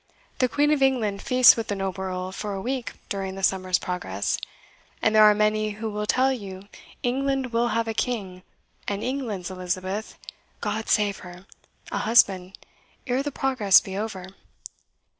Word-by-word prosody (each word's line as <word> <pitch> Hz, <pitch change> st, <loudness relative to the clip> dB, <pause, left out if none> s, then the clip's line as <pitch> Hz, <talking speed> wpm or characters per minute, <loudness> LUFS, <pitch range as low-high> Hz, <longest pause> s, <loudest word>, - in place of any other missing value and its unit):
The 255 Hz, -, +3 dB
Queen 290 Hz, +4 st, +2 dB
of 300 Hz, -2 st, +2 dB
England 230 Hz, -7 st, +1 dB
feasts 255 Hz, -1 st, +7 dB
with 225 Hz, -1 st, -4 dB
the 205 Hz, -, -2 dB
noble 190 Hz, -1 st, -3 dB
Earl 185 Hz, 0 st, -4 dB
for 205 Hz, +1 st, -5 dB
a 195 Hz, -, -4 dB
week 255 Hz, +2 st, -3 dB
during 195 Hz, -2 st, -4 dB
the 195 Hz, -, -7 dB
Summer's 185 Hz, -2 st, +2 dB
Progress; 140 Hz, -, -3 dB, 0.6 s
and 220 Hz, -, +2 dB
there 215 Hz, -, +6 dB
are 210 Hz, 0 st, +6 dB
many 215 Hz, 0 st, +1 dB
who 220 Hz, 0 st, -4 dB
will 210 Hz, 0 st, -3 dB
tell 265 Hz, +3 st, +3 dB
you 195 Hz, -4 st, -8 dB, 0.4 s
England 265 Hz, 0 st, -1 dB
will 235 Hz, +1 st, +2 dB
have 230 Hz, -1 st, 0 dB
a 225 Hz, -, -2 dB
king, 200 Hz, -7 st, -3 dB, 0.5 s
and 200 Hz, +1 st, -2 dB
England's 230 Hz, -9 st, -3 dB
Elizabeth 185 Hz, +3 st, -4 dB, 0.4 s
God 220 Hz, 0 st, -3 dB
save 205 Hz, -2 st, +2 dB
her! 180 Hz, +1 st, -12 dB, 0.5 s
a -, -, -1 dB
husband, 195 Hz, -5 st, +3 dB, 0.5 s
ere 255 Hz, 0 st, 0 dB
the 290 Hz, +1 st, -3 dB
Progress 255 Hz, -8 st, +4 dB
be 190 Hz, -, -8 dB
over." 200 Hz, -3 st, -4 dB
210 Hz, 165 wpm, -25 LUFS, 190-245 Hz, 0.6 s, feasts